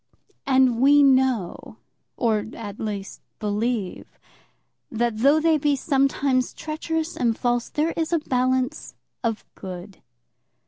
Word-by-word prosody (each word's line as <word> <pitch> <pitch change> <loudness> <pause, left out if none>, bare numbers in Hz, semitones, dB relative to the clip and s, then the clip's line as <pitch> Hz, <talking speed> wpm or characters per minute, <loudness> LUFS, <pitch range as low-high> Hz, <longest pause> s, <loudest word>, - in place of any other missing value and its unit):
And 260 -3 +3
we 285 +2 +6
know 260 -8 +1 0.4
or, 220 -4 +1
at 205 -2 -8
least, 205 -2 -5 0.2
believe, 210 -1 -3 0.7
that 230 -1 -1
though 280 +6 +5
they 315 -1 +3
be 290 0 +2
sometimes 270 -2 +1
treacherous 320 +1 -3
and 230 -2 0
false, 240 -1 0
there 310 +2 0
is 325 0 -2
a 340 - +3
balance 255 -3 -1 0.3
of 225 -2 -2
good. 185 +1 -9
255 Hz, 120 wpm, -24 LUFS, 220-285 Hz, 0.7 s, we